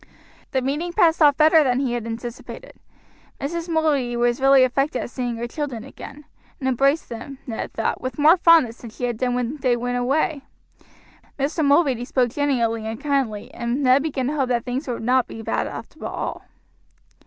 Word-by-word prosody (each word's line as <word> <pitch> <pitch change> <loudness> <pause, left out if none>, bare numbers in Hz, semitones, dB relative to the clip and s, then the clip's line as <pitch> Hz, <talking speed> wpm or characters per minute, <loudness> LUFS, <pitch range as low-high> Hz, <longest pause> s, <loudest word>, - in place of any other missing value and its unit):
The 260 -2 -1
meeting 300 +6 -2
passed 330 -1 +3
off 290 -2 +6
better 315 0 +6
than 255 -2 +1
he 260 -3 -1
had 235 -2 -3
anticipated. 240 - -7 0.7
Mrs. 335 +5 -4
Mulready 290 -7 +1
was 240 +1 +1
really 270 -1 +6
affected 275 +2 0
at - - -8
seeing 245 -2 -3
her 230 +1 -4
children 265 -4 -5
again, 285 +2 -11 0.3
and 265 - -2
embraced 275 +4 +2
them, 265 +4 -8
Ned 225 -2 -5
thought, 225 - -2
with 255 0 -5
more 305 +3 +6
fondness 330 -10 +4
than 235 - -9
she 220 - -10
had 240 -2 -1
done 245 +1 0
when 250 +4 -2
they 255 -3 +1
went 245 +1 -2
away. 280 +4 0 1.0
Mr. 295 +3 -1
Mulready 280 -4 +3
spoke 245 -2 0
genially 235 -6 0
and 220 +1 -5
kindly, 270 -8 -2
and 240 +4 -2
Ned 260 +1 +5
began 275 -4 -2
to 280 - -1
hope 270 -4 0
that 240 -2 0
things 255 +4 -3
would 240 -3 -4
not 250 +1 +2
be - - -9
so 225 - -8
bad - - -1
after - - -9
all. - - -5
260 Hz, 190 wpm, -22 LUFS, 240-290 Hz, 1.0 s, off